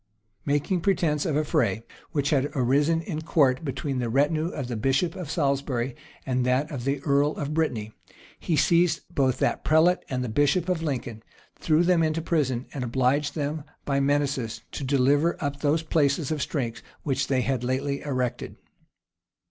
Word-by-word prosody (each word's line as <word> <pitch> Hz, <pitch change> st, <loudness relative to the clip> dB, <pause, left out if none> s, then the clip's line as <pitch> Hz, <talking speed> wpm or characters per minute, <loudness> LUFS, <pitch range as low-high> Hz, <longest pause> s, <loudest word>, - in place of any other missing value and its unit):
[*] 105 Hz, -1 st, -44 dB
Making 145 Hz, +6 st, +1 dB
pretence 165 Hz, -6 st, +1 dB
of 155 Hz, -, 0 dB
a 155 Hz, -, +2 dB
fray, 115 Hz, -6 st, 0 dB, 0.3 s
which 145 Hz, 0 st, 0 dB
had 145 Hz, -1 st, +2 dB
arisen 145 Hz, +6 st, +2 dB
in 160 Hz, -4 st, -4 dB
court 145 Hz, -4 st, +2 dB
between 135 Hz, -1 st, -3 dB
the 120 Hz, -2 st, -1 dB
retinue 150 Hz, +6 st, +2 dB
of 145 Hz, -7 st, -4 dB
the 120 Hz, -, -3 dB
bishop 135 Hz, +9 st, +1 dB
of 180 Hz, -6 st, -6 dB
Salisbury 140 Hz, -5 st, -1 dB, 0.3 s
and 130 Hz, -1 st, 0 dB
that 130 Hz, +4 st, +1 dB
of 130 Hz, -4 st, -5 dB
the 140 Hz, 0 st, -1 dB
earl 145 Hz, +1 st, +2 dB
of 145 Hz, +1 st, -3 dB
Brittany, 120 Hz, -10 st, -1 dB, 0.5 s
he 165 Hz, -, -1 dB
seized 170 Hz, +3 st, +3 dB
both 130 Hz, -3 st, +2 dB
that -, -, 0 dB
prelate 165 Hz, +4 st, +4 dB
and 125 Hz, -1 st, -2 dB
the -, -, -3 dB
bishop 145 Hz, +9 st, +1 dB
of 180 Hz, -3 st, 0 dB
Lincoln, 125 Hz, -7 st, -3 dB, 0.4 s
threw 160 Hz, +1 st, +3 dB
them 175 Hz, -1 st, +3 dB
into 160 Hz, 0 st, +1 dB
prison, 130 Hz, -7 st, 0 dB
and 135 Hz, -, -3 dB
obliged 130 Hz, +4 st, +1 dB
them 150 Hz, 0 st, -2 dB, 0.2 s
by 140 Hz, -1 st, +1 dB
menaces 140 Hz, -4 st, 0 dB
to -, -, -5 dB
deliver 140 Hz, +5 st, +2 dB
up 140 Hz, -3 st, -3 dB
those 155 Hz, +2 st, +1 dB
places 145 Hz, -2 st, +1 dB
of 155 Hz, -2 st, -1 dB
strength 125 Hz, -5 st, -3 dB, 0.2 s
which 135 Hz, -3 st, 0 dB
they 130 Hz, -2 st, +1 dB
had 130 Hz, -1 st, -1 dB
lately 140 Hz, +3 st, -1 dB
erected. 125 Hz, -4 st, -3 dB
140 Hz, 175 wpm, -26 LUFS, 130-155 Hz, 0.5 s, prelate